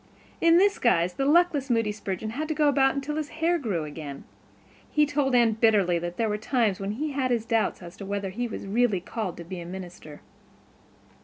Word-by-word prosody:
In 335 0 +6
this 400 +2 +3
guise 175 -7 +2
the 270 +6 -1
luckless 310 -3 +3
Moody 225 -3 +1
Spurgeon 205 +1 -5
had 300 +7 -3
to 315 - -2
go 300 -1 +3
about 270 -1 +3
until 285 +2 -3
his 305 -2 -3
hair 335 +2 +2
grew 200 - -2
again. 150 -2 -7 0.7
He 300 0 +3
told 285 -3 0
Anne 235 -2 +5
bitterly 210 -6 +3
that 175 +1 -5
there 225 - +1
were 210 0 -2
times 220 -4 0
when 195 +1 -3
he 295 +6 -3
had 270 -2 -1
his 235 -3 0
doubts 225 -4 0
as 170 0 -10
to 200 - -7
whether 200 -1 -3
he 240 +5 -3
was 220 - -7
really 215 -1 +1
called 190 0 -5
to 170 - -7
be 175 +2 -7
a - - -8
minister. 175 -5 -9
225 Hz, 215 wpm, -26 LUFS, 190-280 Hz, 0.7 s, In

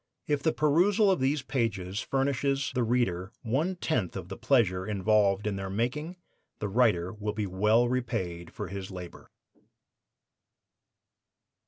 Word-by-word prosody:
If 145 -2 0
the 160 - +2
perusal 185 +8 +3
of 185 - +1
these 135 +2 +1
pages 105 -8 -2
furnishes 135 +1 0
the 125 - 0
reader 110 -6 0
one 145 +11 0
tenth 125 - -1
of - - -6
the - - -5
pleasure 100 -9 +2
involved 105 0 +2
in 105 -2 -1
their 95 0 -4
making, 125 - -2 0.4
the 105 - -3
writer 95 -6 +2
will 105 0 -3
be 105 -1 -2
well 105 +6 +3
repaid 95 -9 -3
for - - -6
his 95 -1 -6
labor. 90 -2 -9
115 Hz, 140 wpm, -29 LUFS, 95-135 Hz, 0.4 s, perusal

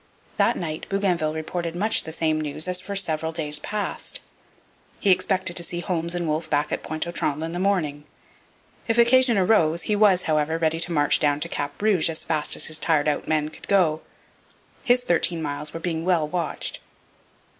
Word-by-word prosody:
That - - +3
night 155 -3 -5
Bougainville 180 -6 0
reported 170 +1 -4
much 210 +5 +2
the 160 - -6
same 155 -1 0
news 155 +2 -1
as 180 0 +1
for 200 +2 -6
several 160 -4 -1
days 150 -2 0
past. 210 +4 -4 0.8
He 200 - +3
expected 185 -1 0
to 175 - +1
see 175 0 -4
Holmes 170 -1 -2
and 175 -1 -2
Wolfe 155 +1 -2
back 145 0 0
at - - -2
Pointe 155 +1 -3
aux - - -3
Trembles 155 -2 -1
in 165 - -5
the 175 - -4
morning. 160 -7 0 0.8
If 225 0 +1
occasion 240 0 +5
arose, 175 -4 +3
he 210 - 0
was, 205 -3 +4
however, 155 0 0
ready 165 0 0
to 175 +1 0
march 145 -3 +2
down 145 -1 +2
to - - -1
Cap 145 0 -4
Rouge 200 -6 +2
as 160 - -1
fast 155 -2 -1
as - - -3
his 155 0 -4
tired 155 -3 +1
out 150 - -1
men 155 -1 0
could 155 - -14
go. 165 -6 +2 0.8
His 245 0 +3
thirteen 175 -4 +1
miles 150 -1 -3
were 165 - -6
being 165 -1 -3
well 170 -4 +2
watched. 170 -1 -4
165 Hz, 195 wpm, -24 LUFS, 155-185 Hz, 0.8 s, occasion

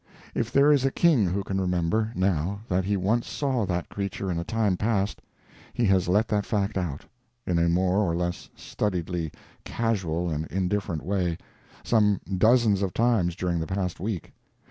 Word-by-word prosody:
If 120 +1 -2
there 140 +3 +5
is 140 -3 +4
a 135 - +3
king 135 - +3
who 95 +3 -1
can 95 0 -2
remember, 90 +5 0
now, 95 +1 0
that 90 -1 0
he 100 +1 +1
once 110 +5 0
saw 125 -2 -1
that 90 -1 -2
creature 100 -1 -4
in 85 - -1
a - - -2
time 105 -1 0
past, 105 0 -1 0.5
he 120 - +1
has 95 -3 +3
let 105 +5 +3
that 105 -1 +1
fact 100 -1 -1
out, 85 -7 -3 0.4
in 85 -2 +1
a 85 0 +3
more 90 +3 +2
or 90 -5 +1
less 85 0 -3
studiedly 90 -5 -3 0.3
casual 90 -7 -1
and 80 +1 -2
indifferent 95 -3 -2
way, 90 -4 0 0.5
some 105 -3 +3 0.2
dozens 110 -3 +4
of 95 -2 -2
times 110 -8 +2
during 90 -2 -1
the 80 - -3
past 95 -2 -2
week. 95 -3 -4
95 Hz, 175 wpm, -26 LUFS, 90-110 Hz, 0.5 s, there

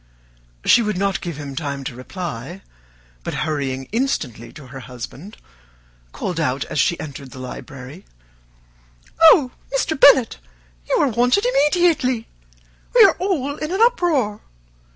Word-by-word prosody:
She - - +6
would 210 -3 -1
not 195 0 0
give 170 -5 -5
him 140 -2 -7
time 140 -3 -4
to 130 - -5
reply, 165 +4 -7 0.6
but - - -4
hurrying 135 -4 -3
instantly 160 - -2
to 150 -3 -12
her 135 +1 -10
husband, 130 - -9 0.7
called 175 - -4
out, 135 -4 -1
as - - -3
she 170 - +2
entered 140 -3 -8
the 130 - -12
library, 130 +5 -9 1.2
"Oh, 310 -5 +7 0.2
Mr. 280 +2 -1
Bennet, 265 -4 +6 0.5
you - - +2
are - - +3
wanted 245 - +2
immediately; 295 - +2 0.7
we - - +9
are - - +6
all 295 -7 -1
in 305 +2 -4
an 380 - -1
uproar. 335 - +2
185 Hz, 135 wpm, -21 LUFS, -, 1.2 s, we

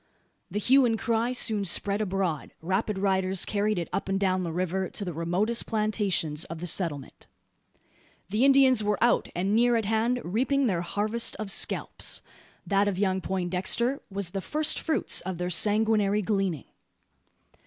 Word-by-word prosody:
The - - -4
hue 260 +6 +4
and 230 -2 +1
cry 230 0 0
soon 220 -4 +1
spread 200 +2 +3
abroad. 185 -6 -2
Rapid 190 +4 -2
riders 190 -1 0
carried 210 0 0
it 170 - -3
up - - -3
and 195 0 0
down 185 -2 +1
the 170 -2 -3
river, 185 +2 -2
to 200 - -6
the 175 - -4
remotest 180 +8 -1
plantations 205 -8 0
of 165 - -7
the 175 - -5
settlement. 160 -6 -3 1.0
The 215 +5 +1
Indians 270 -4 +5
were 210 -1 0
out, 240 - +2
and 190 +4 0
near 240 +1 +3
at 225 -2 0
hand, 225 +4 0
reaping 260 +9 0
their 185 -7 0
harvest 210 +6 0
of 215 -2 -5
scalps! - - -1 0.4
That 200 0 +2
of 200 -3 -1
young 190 -1 0
Poindexter 190 +8 0
was 195 -3 -3
the 195 0 -3
firstfruits 310 +4 0
of 185 -1 -5
their 180 +1 -3
sanguinary 210 +1 +2
gleaning! 195 - -1
200 Hz, 160 wpm, -27 LUFS, 185-225 Hz, 1.0 s, Indians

